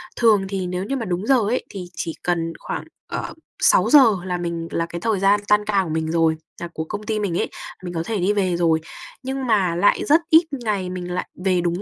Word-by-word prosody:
Thường 215 -5 +4
thì 190 -2 -2
nếu 180 +1 -3
như 270 +7 -2
mà 235 - -3
đúng 185 +3 -2
giờ 270 - +6
ấy 220 +4 -1
thì 190 -3 -7
chỉ 165 - -3
cần 165 -2 -1
khoảng, - - -5 0.3
ờ, - - -4 0.3
6 - - +5
giờ 295 - +9 0.3
là 180 -1 -2
mình 170 -1 -4
là 165 - 0
cái 170 0 -7
thời 220 -4 0
gian 200 +2 +4
tan 210 0 +3
ca 200 -2 +2
của 170 - -6
mình 160 0 -1
rồi, 165 -1 +3 0.3
là 170 - -3
của 160 - -3
công 205 +6 -6
ty 215 0 -1
mình 185 -5 -1
ấy, - - -1 0.3
mình 175 -1 -5
có 165 0 -2
thể 220 +3 -2
đi 190 +3 +2
về 190 -4 +1
rồi, 165 -2 +2 0.4
nhưng 265 0 -3
mà 195 -7 +2
lại 185 +4 +3
rất 310 +4 +5
ít 320 +2 +7
ngày 215 -8 -2
mình 180 -1 -5
lại 180 - -2 0.2
về 185 -2 +3
đúng 175 +2 -1
185 Hz, 245 wpm, -22 LUFS, 170-210 Hz, 0.4 s, giờ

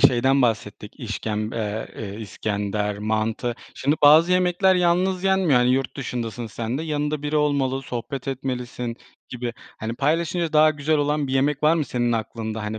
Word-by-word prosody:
şeyden 130 +2 +4
bahsettik, 110 +1 -2
işkemb 110 -2 -3
eee, 105 -2 -4
iskender, 105 0 -2
mantı. 110 +3 -1 0.2
Şimdi 145 +3 +1
bazı 155 +5 +7
yemekler 180 +1 +3
yalnız 180 +1 +2
yenmiyor. 190 -8 +4
Hani 125 - +3
yurt 130 0 0
dışındasın 120 -3 -4
sen 115 +4 -4
de, - - -3
yanında 150 -1 -2
biri 150 +1 -1
olmalı, 140 -3 +1
sohbet 130 +2 -5
etmelisin 125 -3 -4 0.3
gibi. 120 -1 -4 0.3
Hani 110 +1 -4
paylaşınca 165 +4 0
daha 155 0 +6
güzel 155 +1 0
olan 145 0 0
bir 130 - -4
yemek 140 +2 +1
var 155 +2 +5
mı 155 -3 0
senin 120 -2 0
aklında, 110 -1 -3
hani, 105 +1 -4
130 Hz, 160 wpm, -23 LUFS, 115-150 Hz, 0.3 s, bazı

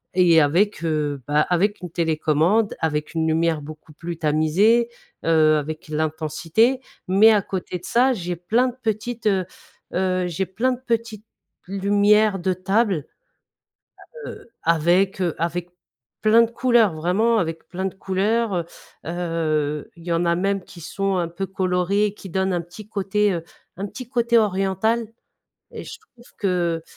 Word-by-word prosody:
et 170 -3 +6
avec, 175 +6 +1
heu, 150 -4 -1
bah, 150 +1 +3
avec 200 +4 +1
une 180 - -6
télécommande, 165 +6 +1
avec 150 -1 -2
une 160 -1 0
lumière 160 -1 +1
beaucoup 155 +1 -11
plus 165 +1 -6
tamisée, 165 +10 +3 0.4
heu, 155 -1 +4
avec 155 +3 -5
l'intensité, 160 - 0 0.3
mais 205 +4 +6
à 210 -2 +3
côté 185 -1 -4
de 180 - -13
ça, 255 +3 +3
j'ai 175 -4 -4
plein 225 +9 +1
de 245 - -5
petites, 225 +1 -2
heu 190 -3 +2 0.5
heu, 185 -1 0
j'ai 175 +3 -2
plein 240 +8 0
de 245 - -7
petites 225 -2 -2 0.4
lumières 205 +1 +3
de 185 +1 0
table, 190 - 0 1.2
heu, - - -10
avec, 175 +4 +2
heu, 170 -3 0
avec 170 +1 -2 0.5
plein 220 +2 +6
de 230 - -2
couleurs, 235 -6 +3
vraiment 205 +8 +2
avec 165 -2 -3
plein 185 +1 -4
de 190 - -3
couleurs, 205 +4 0
heu 170 -1 -1 0.4
heu, 160 -4 -2
il 170 - -14
y 170 - -3
en 170 +1 +1
a 170 - +2
même 195 +1 -1
qui 170 - -13
sont 195 +4 -2
un 170 -1 0
peu 195 +3 -4
colorés 190 +2 0
qui 195 - -10
donnent 190 +2 0
un 175 - 0
petit 180 +5 -12
côté, 205 0 +1
heu, 165 -1 -3 0.3
un 195 - -3
petit 250 +3 -9
côté 235 -2 +2
oriental 210 +3 +1 0.7
et - - -7
je - - -9
trouve 245 - -22
que, 175 -5 0
185 Hz, 160 wpm, -22 LUFS, 165-210 Hz, 1.2 s, et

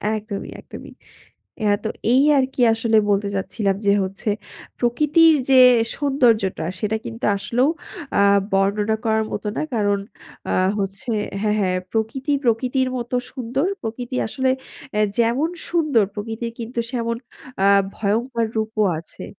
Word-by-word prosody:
একদমই, 210 -2 -5
একদমই। - - -11 0.7
হ্যাঁ, 205 -1 +3
তো 220 - 0 0.2
এই 265 +2 +5
আরকি 265 -1 0
আসলে 225 0 +2
বলতে 200 0 +2
চাচ্ছিলাম 195 +1 -1
যে, 200 - +5
হচ্ছে, 195 +3 -4 0.5
প্রকৃতির 300 +7 +4 0.2
যে, 265 -1 +7 0.4
সৌন্দর্যটা, 240 - +1
সেটা 215 +3 0
কিন্তু 230 +2 -5
আসলেও 245 +7 +1 0.5
আ - - +5 0.3
বর্ণনা 205 +3 +1
করার 220 -1 +2
মতো 205 - -4
না। - - -1
কারণ 205 -2 +1 0.5
আ - - +1 0.3
হচ্ছে 195 +5 -3 0.3
হ্যাঁ, 210 0 +1
হ্যাঁ, 185 -2 +1
প্রকৃতি 230 +6 -2
প্রকৃতির 255 +2 +1
মতো 240 +1 -3 0.2
সুন্দর। 260 +5 -2
প্রকৃতি 240 +3 -5
আসলে 260 +3 0 0.5
আ - - +2 0.2
যেমন 235 +7 +2 0.2
সুন্দর 305 -10 +2
প্রকৃতির 225 +2 -5
কিন্তু 235 +1 -4
সেমন 235 -2 -1 0.5
আ - - +6 0.3
ভয়ঙ্কর 230 +3 0
রূপও 220 0 0 0.2
আছে। 165 - -11
230 Hz, 135 wpm, -21 LUFS, 210-255 Hz, 0.7 s, যে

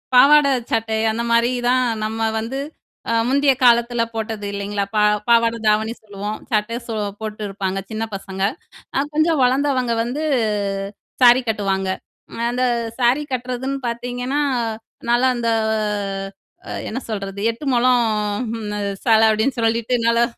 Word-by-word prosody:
பாவாடை, 280 +2 +7 0.2
சட்டை. 225 -1 0
அந்த 235 +2 -2
மாரி 235 +1 +3 0.2
தான், 255 0 +3 0.2
நம்ம 220 +1 -4 0.2
வந்து 250 +5 -4 0.5
அ - - +2 0.2
முந்திய 280 0 +4
காலத்துல 235 0 +4
போட்டது, 220 -2 -4
இல்லைங்களா? 200 0 -2
பா 210 - +3 0.3
பாவாடை, 230 0 +4
தாவணி 220 +2 +2
சொல்லுவோம். 205 0 -5
சட்டை 220 +2 0
சோ 225 - -4 0.3
போட்டு 215 0 -5
இருப்பாங்க, 195 -1 -3
சின்னப் 220 -1 -4
பசங்க. 195 0 -5 0.5
அ 275 - +2
கொஞ்சம் 310 -1 +3
வளர்ந்தவங்க 255 -2 +2
வந்து 270 +6 -3 1.0
சாரி 245 +1 +7
கட்டுவாங்க. 195 -3 -1 0.6
அந்த 250 +1 -1 0.4
சாரி 250 +4 +3
கட்டுறதுன்னு 255 +2 -3
பாத்தீங்கன்னா, 245 +4 -2 0.7
நல்லா 250 +2 +4
அந்த 230 -1 0 1.2
அ - - -6 0.2
என்ன 250 - -3
சொல்றது? 200 -2 -4
8 235 +6 -5
மொழம் 245 0 +4 0.6
அந்த 210 0 -4 0.3
சேலை 225 -1 +5
அப்பிடின்னு 220 +4 +1
சொல்லிட்டு, 230 +1 0
நல்லா 235 0 +4
235 Hz, 130 wpm, -20 LUFS, 215-255 Hz, 1.2 s, பாவாடை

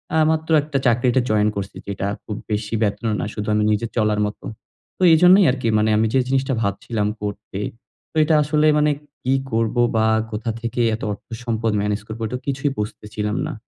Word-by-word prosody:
আ - - +3
মাত্র 160 0 -2
একটা 145 -1 -3
চাকরিতে 120 +2 +3
জয়েন 105 0 +3
করছি, 100 -1 -5
যেটা 100 0 -3 0.2
খুব 105 - -5 0.2
বেশি 105 +1 -2
বেতন 105 +2 -1
ও - - 0
না। - - -2
শুধু 105 -1 -5
আমি 105 0 +2
নিজে 105 +2 0
চলার 105 -1 +2
মতো। 105 - -6 0.5
তো - - -14
এইজন্যই 180 +4 +7
আরকি 125 -3 -3
মানে, 110 +1 +2
আমি 110 - +3
যে 135 - +4
জিনিসটা 135 0 0
ভাবছিলাম 105 +1 -1
করতে, 100 -1 -5 0.5
তো - - -35
এটা 155 0 +3
আসলে 150 +1 +2
মানে 150 0 +3 0.3
কি 130 +1 +1 0.2
করব, 115 +1 0 0.2
বা 110 0 +3 0.3
কোথা 110 +2 -3
থেকে 120 +1 -2
এত - - -10
অর্থ-সম্পদ 115 +1 -3
ম্যানেজ 105 0 -1
করব? 110 +1 -7
এটা 125 +3 -4
কিছুই 140 +1 -1
বুঝতেছিলাম 105 0 -4
না। - - -5
115 Hz, 190 wpm, -21 LUFS, 105-130 Hz, 0.5 s, এইজন্যই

